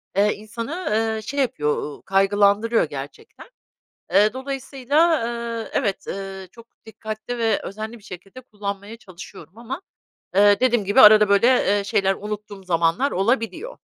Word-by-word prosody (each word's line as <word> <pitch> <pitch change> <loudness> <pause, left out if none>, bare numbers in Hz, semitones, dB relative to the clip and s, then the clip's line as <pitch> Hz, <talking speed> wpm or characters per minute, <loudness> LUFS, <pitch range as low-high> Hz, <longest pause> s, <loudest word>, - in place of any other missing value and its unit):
eee, 205 +2 +3
insanı, 230 - -6
eee, 220 0 0
şey 280 +6 -5
yapıyor, 235 - 0
ııı, 145 - -8
kaygılandırıyor 205 +3 +2
gerçekten. 145 -2 -9 0.7
Eee, 205 +3 +4
dolayısıyla, 275 +4 0 0.4
eee, - - -12
evet, 210 -9 -2
eee, 195 -1 -6
çok 230 -1 -15 0.2
dikkatli 220 +2 -7
ve 225 -3 +1
özenli 220 +4 -7
bir - - -23
şekilde 195 +6 -11
kullanmaya 205 -2 -7
çalışıyorum 195 0 -13
ama, 260 +9 -7 0.5
eee, 205 +1 +5
dediğim 240 -5 +2
gibi 205 +7 +3
arada 210 -1 +8
böyle, 200 +3 +4 0.3
eee, 200 - -3
şeyler, 195 -1 +1
unuttuğum 210 -1 -8
zamanlar 170 +9 +1
olabiliyor. 230 - -1
210 Hz, 140 wpm, -22 LUFS, 195-240 Hz, 0.7 s, arada